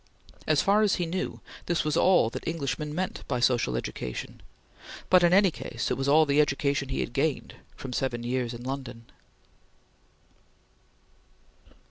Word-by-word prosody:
As 155 Hz, -2 st, +3 dB
far 205 Hz, +2 st, +4 dB
as 210 Hz, -2 st, +3 dB
he 175 Hz, -, -1 dB
knew, 180 Hz, +3 st, -4 dB, 0.3 s
this 175 Hz, -1 st, +1 dB
was 150 Hz, -2 st, -1 dB
all 180 Hz, -11 st, +4 dB
that -, -, -7 dB
Englishmen 150 Hz, -1 st, -3 dB
meant 185 Hz, +1 st, -3 dB
by 125 Hz, -3 st, -1 dB
social 120 Hz, -, +2 dB
education, -, -, -6 dB, 0.7 s
but 185 Hz, -1 st, +7 dB
in 175 Hz, -1 st, +4 dB
any 195 Hz, 0 st, +5 dB
case -, -, -4 dB
it -, -, +3 dB
was 135 Hz, 0 st, -2 dB
all 155 Hz, +3 st, +5 dB
the 145 Hz, +1 st, +4 dB
education 140 Hz, -1 st, 0 dB
he 135 Hz, -, -1 dB
had -, -, -4 dB
gained 140 Hz, +1 st, -1 dB, 0.2 s
from 130 Hz, -2 st, -7 dB
seven 120 Hz, -2 st, -2 dB
years 125 Hz, 0 st, -1 dB
in 120 Hz, 0 st, -8 dB
London. 130 Hz, -3 st, -6 dB
140 Hz, 155 wpm, -27 LUFS, 125-170 Hz, 0.7 s, but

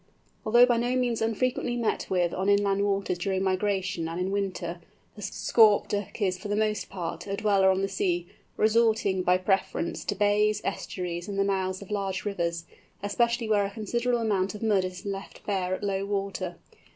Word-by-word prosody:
Although 240 Hz, +3 st, +7 dB
by 240 Hz, -1 st, +2 dB
no 240 Hz, +2 st, 0 dB
means 245 Hz, -3 st, 0 dB
unfrequently 240 Hz, +2 st, 0 dB
met 235 Hz, -2 st, -1 dB
with 175 Hz, -2 st, +1 dB
on 190 Hz, +2 st, 0 dB
inland 200 Hz, 0 st, +3 dB
waters 195 Hz, -3 st, 0 dB
during 190 Hz, +1 st, -1 dB
migration 190 Hz, -3 st, 0 dB
and 165 Hz, +2 st, -4 dB
in 185 Hz, +1 st, -1 dB
winter, 180 Hz, -3 st, -3 dB, 0.3 s
the 210 Hz, -, -10 dB
Scaup 210 Hz, +1 st, +4 dB
Duck 205 Hz, +1 st, -3 dB
is, 185 Hz, -3 st, 0 dB
for 200 Hz, -, -6 dB
the 205 Hz, -, 0 dB
most 215 Hz, -1 st, 0 dB
part, 180 Hz, -1 st, -5 dB
a 195 Hz, -, -2 dB
dweller 200 Hz, -2 st, +3 dB
on 190 Hz, 0 st, +2 dB
the -, -, +1 dB
sea, 175 Hz, -3 st, -1 dB, 0.3 s
resorting, 220 Hz, -3 st, +3 dB
by 180 Hz, 0 st, +3 dB
preference, 185 Hz, -2 st, -1 dB
to 205 Hz, -, -1 dB
bays, 210 Hz, +1 st, +2 dB
estuaries, 175 Hz, -1 st, -4 dB
and 200 Hz, -1 st, -4 dB
the 195 Hz, -, +3 dB
mouths 190 Hz, -1 st, -1 dB
of 200 Hz, -, -13 dB
large 195 Hz, -2 st, -2 dB
rivers, 170 Hz, -4 st, -2 dB, 0.4 s
especially 235 Hz, +3 st, +1 dB
where 210 Hz, -2 st, +3 dB
a -, -, -3 dB
considerable 235 Hz, +3 st, -1 dB
amount 200 Hz, -2 st, 0 dB
of 210 Hz, -, -7 dB
mud 205 Hz, -4 st, +3 dB
is 185 Hz, 0 st, -7 dB
left 200 Hz, -1 st, -6 dB
bare 185 Hz, -2 st, 0 dB
at -, -, -9 dB
low 195 Hz, -1 st, -1 dB
water. 195 Hz, -3 st, -3 dB
200 Hz, 190 wpm, -27 LUFS, 185-215 Hz, 0.4 s, Although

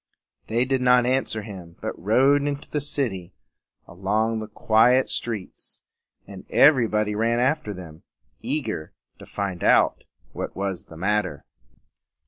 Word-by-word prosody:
They 120 Hz, +3 st, +1 dB
did 130 Hz, 0 st, 0 dB
not 125 Hz, -1 st, +4 dB
answer 125 Hz, -4 st, -1 dB
him, 90 Hz, -5 st, -10 dB
but -, -, -4 dB
rode 130 Hz, +9 st, +3 dB
into 145 Hz, 0 st, -4 dB
the 150 Hz, -, -2 dB
city 120 Hz, -11 st, -2 dB, 0.5 s
and 85 Hz, -, -15 dB
along 110 Hz, +4 st, 0 dB
the 110 Hz, -, -6 dB
quiet 115 Hz, +4 st, +3 dB
streets; 110 Hz, -6 st, -5 dB, 0.4 s
and 95 Hz, -2 st, -11 dB
everybody 110 Hz, -7 st, +4 dB
ran 115 Hz, +2 st, +1 dB
after 130 Hz, -1 st, 0 dB
them, 85 Hz, -4 st, -10 dB, 0.4 s
eager 80 Hz, -, -4 dB, 0.3 s
to -, -, -12 dB
find 100 Hz, -4 st, -4 dB
out -, -, +3 dB, 0.3 s
what -, -, -5 dB
was 95 Hz, -2 st, -3 dB
the 80 Hz, -, -13 dB
matter. 95 Hz, -4 st, -1 dB
110 Hz, 135 wpm, -24 LUFS, 95-125 Hz, 0.5 s, not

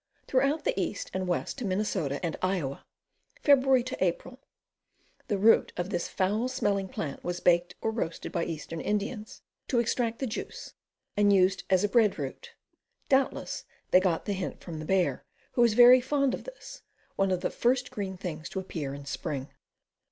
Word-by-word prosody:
Throughout 275 Hz, +4 st, +1 dB
the -, -, +1 dB
east, 185 Hz, -, -4 dB
and 185 Hz, -1 st, -2 dB
west 180 Hz, +9 st, -2 dB
to -, -, -4 dB
Minn, 195 Hz, +2 st, 0 dB, 0.4 s
and 165 Hz, -2 st, -1 dB
Iowa. 180 Hz, -8 st, -1 dB, 0.6 s
Feb. 260 Hz, -3 st, +4 dB
April. -, -, -1 dB, 0.9 s
The 205 Hz, -, 0 dB
root 220 Hz, +4 st, +4 dB
of 175 Hz, +3 st, -3 dB
this 175 Hz, -3 st, -1 dB
foul 210 Hz, +6 st, 0 dB
smelling 205 Hz, -7 st, 0 dB
plant 140 Hz, -6 st, -5 dB
was 175 Hz, 0 st, -3 dB
baked 175 Hz, 0 st, +2 dB
or 220 Hz, -, 0 dB
roasted 190 Hz, -7 st, -4 dB
by 170 Hz, -, -1 dB
eastern 165 Hz, 0 st, -5 dB
Indians, 210 Hz, +1 st, -3 dB, 0.2 s
to 250 Hz, -, 0 dB
extract 235 Hz, 0 st, +1 dB
the 265 Hz, -, -2 dB
juice, 235 Hz, -2 st, -6 dB, 0.4 s
and 205 Hz, -1 st, +4 dB
used 190 Hz, -1 st, +3 dB
as 185 Hz, 0 st, +4 dB
a -, -, +3 dB
bread 215 Hz, -2 st, +3 dB
root. 475 Hz, -1 st, -6 dB, 0.5 s
Doubtless 270 Hz, 0 st, +1 dB, 0.3 s
they 185 Hz, -, +8 dB
got 185 Hz, -3 st, 0 dB
the 205 Hz, -, -1 dB
hint 190 Hz, -1 st, -4 dB
from 165 Hz, -3 st, -6 dB
the 155 Hz, -, -6 dB
bear, 190 Hz, +1 st, +1 dB, 0.3 s
who 240 Hz, -, +3 dB
is 230 Hz, -3 st, +3 dB
very 245 Hz, +1 st, +9 dB
fond 275 Hz, 0 st, +1 dB
of -, -, -5 dB
this, -, -, -10 dB, 0.3 s
one 195 Hz, 0 st, +2 dB
of 185 Hz, -1 st, 0 dB
the -, -, -1 dB
first 250 Hz, +1 st, +1 dB
green 190 Hz, -2 st, -4 dB
things 170 Hz, -4 st, -5 dB
to 190 Hz, -, -3 dB
appear 150 Hz, -7 st, -5 dB
in 140 Hz, 0 st, -9 dB
spring. 140 Hz, -2 st, -4 dB
200 Hz, 175 wpm, -29 LUFS, 175-245 Hz, 0.9 s, very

